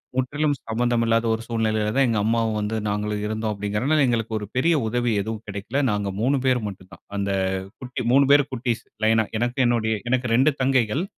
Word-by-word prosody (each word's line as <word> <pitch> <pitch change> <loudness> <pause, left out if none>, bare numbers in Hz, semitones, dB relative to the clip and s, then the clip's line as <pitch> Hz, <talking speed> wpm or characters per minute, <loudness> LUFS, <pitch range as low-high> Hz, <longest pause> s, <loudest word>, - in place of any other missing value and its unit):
முற்றிலும் 145 +3 0
சம்மந்தம் 120 +1 +1
இல்லாத 115 0 +2
ஒரு 110 - -3
சூழ்நிலைல 110 -2 0
தான் 135 0 +4
எங்க 115 - +1
அம்மாவும் 115 -1 +1
வந்து 105 +2 -2
நாங்களும் 105 0 -2
இருந்தோம் 110 0 -2
அப்டிங்கறனால 105 +9 0
எங்களுக்கு 115 -2 -1
ஒரு 105 - -5
பெரிய 165 +6 +3
உதவி 120 +1 0
எதுவும் 110 +1 -5
கெடைக்ல. 100 +6 -3
நாங்க 105 -1 -1
3 135 +4 +2
பேரு 130 -1 +3
மட்டும் 95 -2 -9
தான். - - -14 0.2
அந்த 100 0 -1 0.5
குட்டி 125 0 -5
3 140 +2 +5
பேரு 145 0 +7
குட்டீஸ், 120 -2 -2 0.2
லைனா. 110 0 +4 0.2
எனக்கு 120 +2 -1
என்னுடய 115 -2 +1
எனக்கு 125 0 +1
2 135 +5 +4
தங்கைகள். 130 +2 +2
115 Hz, 185 wpm, -23 LUFS, 110-130 Hz, 0.5 s, பேரு